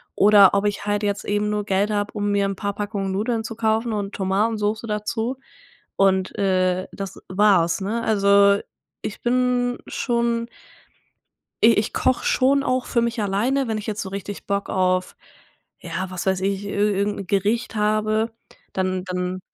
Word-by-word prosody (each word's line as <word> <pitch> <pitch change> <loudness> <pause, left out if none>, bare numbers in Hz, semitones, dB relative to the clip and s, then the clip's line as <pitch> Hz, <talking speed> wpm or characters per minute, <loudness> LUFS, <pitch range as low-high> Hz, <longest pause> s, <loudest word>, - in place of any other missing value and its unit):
oder 205 -1 +7
ob 200 +1 +1
ich 205 0 -1
halt 205 0 0
jetzt 205 0 -1
eben 205 0 0
nur 210 -1 -1
Geld 200 +1 +1
habe, 205 0 -1
um 205 0 -1
mir 200 -1 +2
'n 195 - -3
paar 200 +1 -3
Packungen 200 -2 -3
Nudeln 225 +3 -1
zu 225 - -6
kaufen 225 +1 0
und 205 -2 -3
Tomatensoße 210 +3 0
dazu 220 +4 -2 0.6
und, 190 -1 +2
äh, 185 -2 +1
das 195 -2 -7
war's, 190 -3 +3
ne? 215 +5 -2
Also, 200 -2 +4 0.4
ich 205 - -6
bin 245 0 +1
schon 235 -1 -1 1.2
i 230 +1 +7
ich 210 - 0
koche 255 - +1
schon 275 +2 +3
auch 255 -1 0
für 235 - +1
mich 235 -2 -1
alleine, 235 +7 0
wenn 220 -1 -1
ich 210 - -7
jetzt 215 -1 -3
so 190 - -6
richtig 200 +1 -7
Bock 200 0 -1
auf, 185 -1 0 0.6
ja, 190 - -4
was 185 0 -5
weiß 190 -1 +1
ich, 195 +1 -1
i 200 - -5
irgend 205 0 0
'n 195 - -7
Gericht 215 +4 0
habe, 215 +1 +1 0.4
dann 185 -1 -1
dann 180 0 -3
205 Hz, 170 wpm, -22 LUFS, 195-225 Hz, 1.2 s, oder